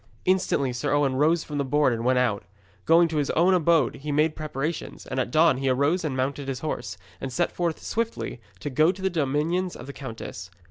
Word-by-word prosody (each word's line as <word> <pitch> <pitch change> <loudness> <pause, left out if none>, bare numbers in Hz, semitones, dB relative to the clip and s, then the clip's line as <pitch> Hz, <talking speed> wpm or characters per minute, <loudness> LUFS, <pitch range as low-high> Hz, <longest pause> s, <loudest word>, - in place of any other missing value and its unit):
Instantly 180 -8 +1
Sir 145 +4 0
Owen 140 -3 +2
rose 155 +4 +3
from 145 -1 -5
the - - +2
board 145 -1 +2
and 115 0 -3
went 130 +1 +3
out. 115 -5 +1 0.4
Going 165 +1 +6
to 160 - -2
his 145 -1 0
own 175 +4 +3
abode 165 -6 +3
he 150 +2 -5
made 150 +2 +2
preparations, 155 +1 -4
and 130 - -3
at 125 - -1
dawn 155 0 +4
he 135 0 0
arose 140 +8 +2
and 140 -5 -2
mounted 135 +2 -2
his 135 -2 -4
horse, 125 -7 -4 0.2
and 135 - -4
set 175 +7 0
forth 170 -2 -2
swiftly 230 - -3 0.2
to 145 - -4
go 155 +6 +4
to 190 - -11
the 190 - +1
dominions 165 +4 0
of 120 - -9
the 140 - -8
countess. 115 -9 -7
145 Hz, 220 wpm, -25 LUFS, 130-165 Hz, 0.4 s, Going